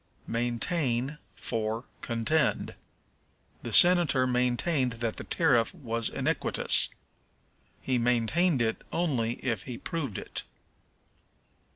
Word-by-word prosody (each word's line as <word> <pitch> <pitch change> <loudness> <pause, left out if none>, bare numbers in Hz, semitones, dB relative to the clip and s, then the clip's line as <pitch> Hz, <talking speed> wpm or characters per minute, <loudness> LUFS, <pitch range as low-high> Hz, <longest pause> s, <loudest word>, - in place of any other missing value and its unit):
Maintain 120 +3 -1 0.2
for 115 +1 -3 0.2
Contend. 120 +7 0 0.9
"The - - -6
senator 175 -7 +5
maintained 125 +2 +1
that 115 -1 -3
the - - -5
tariff 130 -5 +2
was 115 -7 -2
iniquitous." - - +2 0.9
He 130 -2 +1
maintained 125 +6 +2
it 110 0 -1
only 130 -10 0
if 110 -6 -1
he 125 -3 -6
proved 155 - -4
it. - - -5
125 Hz, 95 wpm, -28 LUFS, 115-155 Hz, 0.9 s, senator